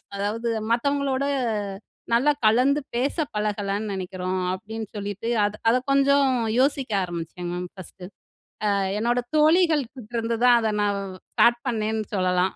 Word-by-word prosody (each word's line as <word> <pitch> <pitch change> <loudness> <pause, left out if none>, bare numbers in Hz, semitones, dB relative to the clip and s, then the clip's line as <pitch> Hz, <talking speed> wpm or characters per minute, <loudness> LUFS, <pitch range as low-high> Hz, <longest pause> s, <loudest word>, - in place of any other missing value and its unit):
அதாவது 215 +4 -2 0.2
மத்தவங்களோட 280 +2 +1 0.9
நல்லா 265 +6 +4
கலந்து 260 +7 +4
பேச 260 +4 0 0.2
பழகலன்னு 205 0 -2
நினைக்கிறோம்" 185 0 -3
அப்டின்னு 220 +2 -6
சொல்லிட்டு. 205 +3 -4 0.2
அத 205 +1 -2
அத 245 - +4
கொஞ்சம் 275 0 +4 0.3
யோசிக்க 270 -2 +1
ஆரம்பிச்சேங்க 175 0 -5
மேம் 180 0 -4
ஃபர்ஸ்ட்டு. 185 -1 -10 0.7
அ - - +1 0.2
என்னோட 240 +2 +1
தோழிகள் 310 -1 +4
கிட்டருந்து 230 -2 -3
தான் 245 -1 +7
அத 220 -1 0
நான் 205 -1 +1
வ் 185 -1 -9 0.2
ஸ்டார்ட் 240 0 +4
பண்ணேன்னு 220 -1 -1
சொல்லலாம். 185 0 +1
220 Hz, 130 wpm, -24 LUFS, 195-260 Hz, 0.9 s, தான்